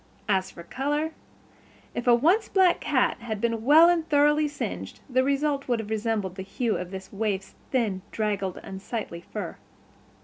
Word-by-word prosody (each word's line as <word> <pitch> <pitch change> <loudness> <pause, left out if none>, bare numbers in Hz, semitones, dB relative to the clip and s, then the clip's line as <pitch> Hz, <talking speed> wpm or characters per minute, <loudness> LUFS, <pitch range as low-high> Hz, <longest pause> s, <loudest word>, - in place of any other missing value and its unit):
As 190 -2 +1
for 170 - -11
color, 295 - -1 0.8
if 240 - -4
a 240 - +7
once 350 - +3
black 375 -3 +4
cat 260 -3 +1
had 225 -3 -4
been 230 0 -1
well 310 +6 +8
and 340 -2 +2
thoroughly 295 +1 +4
singed 290 0 -5
the 255 -1 +2
result 280 +1 0
would 245 -2 +2
have 220 -1 -6
resembled 215 -4 -1
the - - -4
hue 215 +4 -1
of 180 - -4
this 190 +1 -8
waif's 200 -2 -2 0.2
thin, 220 -8 0
draggled, 200 -4 -2
unsightly 195 -2 -5
fur. 205 -6 -5
235 Hz, 165 wpm, -26 LUFS, 200-290 Hz, 0.8 s, well